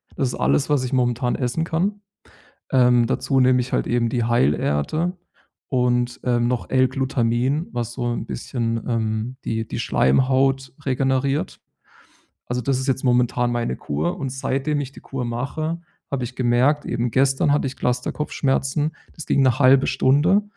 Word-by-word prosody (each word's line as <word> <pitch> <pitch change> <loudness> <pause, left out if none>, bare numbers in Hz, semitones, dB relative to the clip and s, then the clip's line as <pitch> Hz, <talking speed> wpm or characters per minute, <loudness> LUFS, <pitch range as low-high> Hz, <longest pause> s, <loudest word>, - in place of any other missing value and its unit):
Das 130 - 0
ist - - -4
alles, 145 - +1
was 145 -3 +2
ich 130 - -3
momentan 125 -1 +1
essen 125 +5 -1
kann. 195 +6 -1 0.7
Ähm, 125 -2 +4
dazu 135 +3 0
nehme 125 0 +4
ich 125 - -6
halt - - 0
eben 120 -1 +1
die 120 -3 0
Heilerde 120 - +1 0.5
und, 125 -1 0
äh, 120 -1 +1
noch 120 0 -1
L-Glutamin, 130 +2 +1
was 120 -1 -3
so 120 -1 -4
'n - - -4
bisschen, 115 -3 -3
ähm, 115 +1 -2
die 110 0 -2
die - - -5
Schleimhaut 130 - +2
regeneriert. 135 +1 0 0.9
Also, 125 0 -2
das 130 +1 0
ist 130 - -4
jetzt 130 0 0
momentan 125 -1 +2
meine 120 - -2
Kur, 75 +4 -2
und 135 -2 -3
seitdem 135 +2 -1
ich 135 -1 -6
die - - -13
Kur 135 -2 -5
mache, 150 +8 -3 0.3
habe 135 -3 -1
ich 125 +1 -9
gemerkt 130 +4 +2
eben 120 0 -1
gestern 135 +2 +2
hatte 145 - +1
ich 130 - -7
Clusterkopfschmerzen, 135 +3 -1 0.2
das 160 - -9
ging 140 - +2
'ne 130 0 +3
1/2 130 0 +5
Stunde, 145 +10 +3
130 Hz, 160 wpm, -22 LUFS, 120-135 Hz, 0.9 s, 1/2